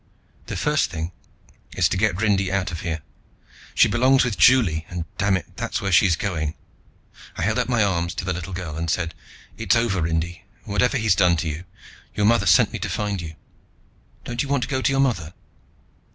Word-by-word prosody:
"The - - -4
first - - +1
thing 80 +2 -5 0.7
is 90 -2 +4
to - - -1
get 100 -1 +1
Rindy 100 -3 +1
out 95 -1 -1
of 80 - -6
here. 80 -3 -3 0.7
She - - +6
belongs 130 +3 +3
with 120 -4 -1
Juli 105 -12 +4
and, 85 -2 -4
damn 100 -1 +2
it, 95 - -11
that's - - -2
where 100 -1 -2
she's 90 0 +5
going." 80 -5 -3 0.8
I - - -2
held 110 +5 +1
out 125 - -1
my 120 -3 +3
arms 85 -3 -1
to - - -4
the 90 - -1
little 90 +2 -6
girl 90 -4 -5
and 85 0 -3
said, 85 0 -1 0.4
"It's - - +2
over, 115 -6 +1
Rindy, 80 +1 -2 0.2
whatever 110 +5 +1
he's 110 -4 +3
done 90 -1 +3
to 80 - -2
you. 80 +4 -5 0.5
Your 105 - +1
mother 110 -3 +3
sent 85 - +5
me - - -4
to - - -3
find 100 -3 -2
you. 80 -2 -8 0.9
Don't 120 -1 -3
you 140 - -4
want 140 -3 +1
to - - -5
go 130 -2 -1
to 135 - +2
your 135 0 +2
mother?" 90 - -1
95 Hz, 205 wpm, -23 LUFS, 85-110 Hz, 0.9 s, She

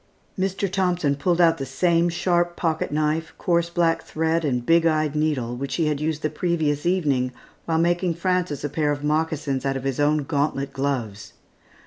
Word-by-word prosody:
Mr. 195 +1 -1
Thompson 180 -6 0
pulled 175 +4 0
out 165 -2 +4
the - - -2
same 170 +5 +2
sharp 175 0 0
pocket 160 -4 -1
knife, 155 +2 -1
coarse 170 -1 +1
black 165 -2 +1
thread, 160 +1 -1
and 125 -5 -1
big 165 0 +4
eyed 155 -2 +1
needle, 145 -6 0
which 135 +2 -4
he 165 - +1
had 150 -1 -1
used 155 0 -2
the 155 - +1
previous 155 -2 0
evening, 145 -9 +1 0.3
while 165 -1 0
making 175 +1 +1
Frances 180 -3 -1
a 145 - -1
pair 150 0 0
of 145 0 -3
moccasins 150 -3 -1
out 135 -1 0
of 130 - -6
his 135 -1 -2
own 150 0 +2
gauntlet 140 -1 -1
gloves. 125 -7 -3
155 Hz, 180 wpm, -23 LUFS, 140-170 Hz, 0.3 s, out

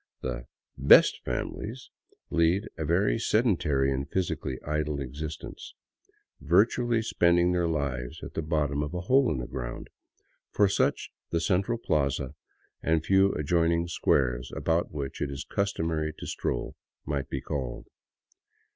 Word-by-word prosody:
The - - -4 0.2
" - - -47
best - - +8
families 120 +5 -4 0.2
" - - -34
lead 85 +6 +2
a 80 - -3
very 95 +8 +2
sedentary 85 - +2
and 70 +2 -3
physically 85 -8 -2
idle 75 -1 -1
existence, 75 +3 -7 0.6
virtually 115 +5 +3
spending 85 -4 +3
their 90 -1 +1
lives 70 -6 -3
at - - -7
the - - -2
bottom 75 -2 0
of 75 +3 -4
a 90 - -2
hole 130 +6 +3
in 75 - -1
the 60 - -3
ground, 65 -2 -6 0.6
for 105 - +3
such 100 - 0 0.2
the 85 - 0
central 100 +7 +1
plaza 70 - 0 0.5
and 80 -1 +1
the - - -13
few 95 0 +4
adjoining 85 +2 +1
squares 65 -7 +1
about 85 +1 0
which 70 -3 -5
it 75 - 0
is 70 0 -5
customary 80 -6 -1
to - - -7
stroll - - -3 0.3
might 70 -2 -2
be - - -2
called. 65 -4 -4
80 Hz, 145 wpm, -28 LUFS, 70-90 Hz, 0.6 s, best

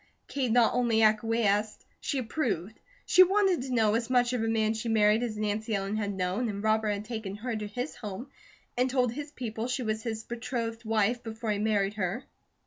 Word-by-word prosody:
Kate 260 -4 -1
not 235 -1 +4
only 235 -3 +2
acquiesced, 215 -1 +2
she 280 - -2
approved. 225 - -2 0.3
She 370 - +6
wanted 380 -3 +4
to 260 0 -5
know 220 -4 +3
as 230 +1 -1
much 245 -1 +3
of 240 -3 0
a - - 0
man 220 -1 +1
she 225 +1 -4
married 215 0 +4
as 230 -3 -3
Nancy 215 +1 -1
Ellen 195 +1 -2
had 205 -2 -1
known, 190 +6 -1
and 200 0 -4
Robert 220 0 +2
had 205 0 -2
taken 220 -4 -5
her 230 +3 -4
to 210 -1 -4
his 245 +8 -4
home 215 +3 -7 0.4
and 250 +1 +2
told 250 -2 +2
his 290 +4 -6
people 235 -5 -4
she 250 0 -2
was 220 -1 -1
his 220 -2 -4
betrothed 230 -1 -4
wife 220 +2 +1
before 225 -1 -4
he 205 - -1
married 205 -2 +1
her. 200 +4 -2
225 Hz, 205 wpm, -29 LUFS, 210-245 Hz, 0.4 s, She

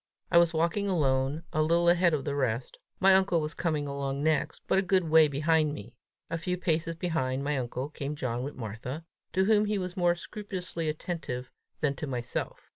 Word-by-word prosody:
I 170 - +7
was 170 -1 +4
walking 170 +5 0
alone, 140 -2 +1
a 155 - +2
little 170 +2 +3
ahead 175 -1 +4
of 140 - -4
the 145 - -1
rest; 130 -3 -2 0.2
my 195 0 +6
uncle 190 -3 +4
was 155 0 -3
coming 155 -4 -1
along 140 0 -3
next, 155 -2 0
but - - +3
a - - +3
good 190 -1 +2
way 160 -1 +7
behind 155 +1 +2
me; 115 +1 -10 0.3
a 165 - -3
few 180 +2 -2
paces 165 -1 0
behind 140 -6 -1
my 145 +1 0
uncle, 130 +1 -3
came 145 -1 -5
John 125 -4 -2
with 140 +3 -5
Martha, 125 +7 -6 0.3
to 190 +2 +3
whom 210 0 +4
he 210 0 0
was 180 -1 -4
more 175 -2 +3
scrupulously 180 -3 -4
attentive 150 -6 -4 0.3
than 145 -3 +2
to 150 - -4
myself. 120 -3 -4
155 Hz, 200 wpm, -29 LUFS, 140-175 Hz, 0.3 s, I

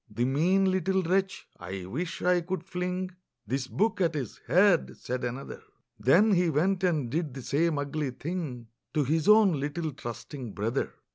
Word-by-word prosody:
"The 120 +3 -1
mean 180 +8 +3
little 190 +1 +1
wretch, 190 +2 0
I 95 -1 -6
wish 165 - -4
I 180 0 +3
could 180 0 -4
fling 180 0 -3 0.3
This 130 +4 -2
book 215 +4 0
at 170 -3 +2
his 130 -8 -4
head!" 185 -1 +4
said 125 0 -4
another; 125 +3 -5 0.4
Then 165 - +5
he 180 -3 +3
went 180 +5 +1
and 155 -8 +1
did 155 -3 -2
the 135 - -7
same 155 +4 +1
ugly 145 0 -2
thing 135 -5 -5 0.3
To 150 - +3
his 155 +3 0
own 210 -8 +6
little 150 +3 -2
trusting 120 -1 -7
brother! 115 +6 -2
160 Hz, 165 wpm, -28 LUFS, 135-185 Hz, 0.4 s, own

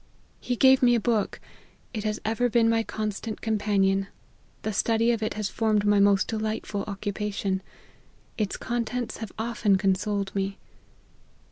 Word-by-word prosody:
He 245 - -2
gave 265 +2 +6
me 245 -1 +5
a - - +2
book 220 -2 0 0.5
it 215 -3 -3
has 215 0 -1
ever 225 +3 +1
been 230 0 +3
my 225 0 +3
constant 215 0 -4
companion 200 -3 +1 0.6
the 215 - -2
study 230 +3 +2
of 230 -2 -1
it 215 - -2
has 210 -1 -1
formed 215 0 +1
my 205 0 +4
most 200 -1 +4
delightful 215 -2 -2
occupation 200 -1 -2 0.7
its 210 -3 -2
contents 240 0 -3
have 220 -4 -6
often 220 -3 +1
con 195 0 +3
soled 200 0 -2
me." 195 0 -2
215 Hz, 150 wpm, -26 LUFS, 200-225 Hz, 0.7 s, gave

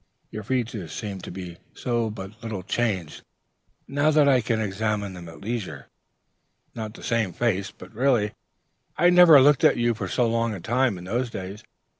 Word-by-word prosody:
Your 105 - -5
features 110 - -3
seem 100 -3 -5
to - - -8
be 90 -2 -8 0.3
but 110 -3 -3
little 110 -5 -5
changed, 95 -7 -2 0.7
now 145 +2 +1
that 150 -2 +4
I 130 -3 +4
can 115 0 -1
examine 105 -1 -2
them 85 -2 -9
at 80 - -13
leisure; 110 -6 -3
yet - - -8
it - - -27
is - - -43
not 110 -2 -5
the - - -12
same 115 -6 0
face. 100 -2 0
But - - -14
really, 120 -3 +2 0.7
I 175 +1 +5
never 175 -4 +8
looked 145 0 +4
at - - +5
you 120 0 +2
for 110 - -5
so 120 -2 +1
long 115 -1 0
a - - -7
time, 120 +2 0
in 90 - -9
those 120 +7 -2
days. 100 +1 -7
110 Hz, 190 wpm, -25 LUFS, 95-120 Hz, 0.7 s, never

